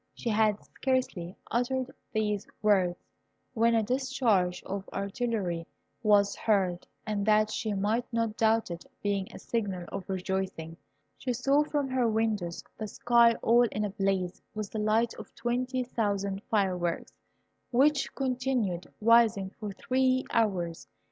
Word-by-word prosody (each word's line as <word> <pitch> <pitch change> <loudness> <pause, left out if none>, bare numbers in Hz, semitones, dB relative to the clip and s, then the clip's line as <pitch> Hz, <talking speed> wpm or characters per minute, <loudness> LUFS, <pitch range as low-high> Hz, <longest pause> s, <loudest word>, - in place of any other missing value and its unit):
She 235 - -2
had 215 -1 +2
scarcely 250 -9 -2 0.2
uttered 255 +2 0 0.2
these 210 -3 -1 0.2
words 185 -4 +3 0.6
when 230 -1 +3
a 225 - +3
discharge 245 -7 +1
of 195 0 -5
artillery 200 -4 -2 0.3
was 205 -2 +4
heard, 190 -5 +1 0.2
and 210 -2 -1
that 215 0 +4
she 215 -2 -2
might 220 +6 0
not 230 -2 0
doubt 225 -3 +2
it 170 0 -6 0.2
being 200 -2 0
a - - -9
signal 195 -6 -3
of 190 - -6
rejoicing, 190 -3 -3 0.4
she 250 - -1
saw 275 +5 +3
from 290 -2 -1
her 255 -2 +2
windows 215 -6 -1 0.2
the 215 - -3
sky 235 +2 +4
all 240 +1 +5
in 210 - -1
a 205 - -3
blaze 195 -3 -1
with 210 -2 -4
the 220 - -3
light 220 +2 +2
of - - -11
twenty 250 +2 -1
thousand 200 -5 -1
fireworks, 180 -5 0 0.6
which 275 +3 +3
continued 250 -9 -1
rising 220 -4 +4
for 210 -1 -6
three 260 +4 +1
hours. 180 -7 0
215 Hz, 140 wpm, -29 LUFS, 195-240 Hz, 0.6 s, all